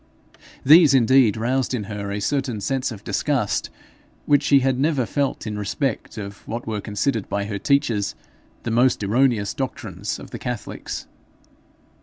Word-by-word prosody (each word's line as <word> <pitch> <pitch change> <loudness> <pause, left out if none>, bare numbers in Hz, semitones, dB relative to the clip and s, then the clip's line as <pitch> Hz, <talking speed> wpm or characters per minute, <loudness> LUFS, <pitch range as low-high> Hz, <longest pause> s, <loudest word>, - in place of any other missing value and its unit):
These 150 -1 +8
indeed 125 -3 +4
roused 130 +3 0
in 110 - -3
her 100 0 -5
a 100 - -2
certain 130 0 -1
sense 130 +4 -1
of 105 -3 -9
disgust - - -1 0.6
which 145 -1 +4
she 140 -2 +4
had 130 -1 +1
never 140 -3 +1
felt 140 +5 -2
in 105 -1 -4
respect 110 +6 -3
of 100 -1 -7
what 115 +2 -4
were 110 -2 -3
considered 105 +2 -2
by 100 0 -1
her 100 -1 -4
teachers 115 -7 +1 0.5
the 115 - -2
most 120 -1 +3
erroneous 115 0 +2
doctrines 105 -7 -4
of - - -11
the - - -6
catholics. 125 -4 -5
120 Hz, 155 wpm, -22 LUFS, 105-135 Hz, 0.6 s, These